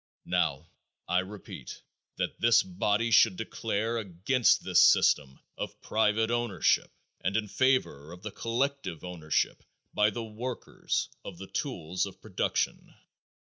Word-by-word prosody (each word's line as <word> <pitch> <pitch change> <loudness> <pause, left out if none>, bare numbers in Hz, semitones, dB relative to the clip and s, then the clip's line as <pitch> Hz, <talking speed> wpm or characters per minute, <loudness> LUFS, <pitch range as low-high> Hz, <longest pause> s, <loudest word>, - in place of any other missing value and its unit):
Now, - - -1 0.4
I 90 - +2
repeat 100 +2 -8 0.3
that - - -3
this 115 0 +5
body 105 +5 0
should 105 -2 +6
declare 115 0 -2
against 105 +6 +2
this - - +4
system 65 -2 +4 0.2
of - - -5
private 110 +1 +1
ownership 120 -7 +1 0.3
and 100 +3 +1
in 110 -1 -1
favor 115 - +1
of 90 +1 -12
the 105 - -5
collective 115 - -2
ownership 85 -4 -1 0.3
by 105 0 +4
the 115 +2 -5
workers 115 +3 -3 0.2
of - - -8
the 95 - -8
tools 95 - -3
of - - -12
production. - - -2
105 Hz, 130 wpm, -29 LUFS, 90-115 Hz, 0.4 s, should